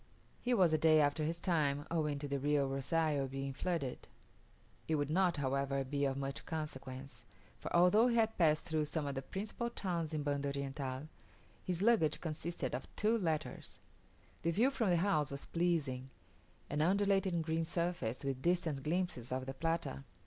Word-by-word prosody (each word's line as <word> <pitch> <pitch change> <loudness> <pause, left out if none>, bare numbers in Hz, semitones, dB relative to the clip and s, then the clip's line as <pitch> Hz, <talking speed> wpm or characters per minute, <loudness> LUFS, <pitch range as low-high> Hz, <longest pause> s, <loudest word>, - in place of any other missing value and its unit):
He 245 0 +1
was 180 -6 +4
a 155 - +3
day 155 -1 +6
after 145 +1 +2
his 165 +2 -2
time, 145 -5 +1
owing 150 -3 0
to 145 +1 -4
the 140 0 -1
Rio 145 0 +2
Rozario 140 +1 0
being 135 +1 -4
flooded. 160 -4 -2 0.8
It 160 - +2
would 145 0 -1
not, 180 0 +3
however, 140 0 0
be 140 +1 -1
of 135 -1 0
much 135 0 -4
consequence; 135 -6 -6 0.4
for, - - -6
although 180 +7 +6
he 240 - +2
had 225 -1 +2
passed 155 -3 +3
through 155 -2 0
some 150 0 -2
of 140 - -2
the 135 - -3
principal 210 - -4
towns 170 -8 -2
in 155 -2 -2
Banda 145 -1 -1
Oriental, 135 0 -4 0.6
his 180 0 -1
luggage 210 -10 +4
consisted 165 +1 -3
of - - -3
two 215 +2 +2
letters! 160 -7 -2 0.6
The 170 - 0
view 230 +11 +3
from 235 -7 0
the 175 - +4
house 165 -5 +2
was 140 0 -5
pleasing; 150 -7 0 0.6
an 150 +1 -1
undulating 195 -1 +2
green 160 +1 0
surface, 170 -6 -2
with 135 -2 -2
distant 170 -4 +1
glimpses 155 -6 -2
of 130 0 -2
the 135 - -4
Plata. 165 - -2
155 Hz, 175 wpm, -35 LUFS, 140-175 Hz, 0.8 s, day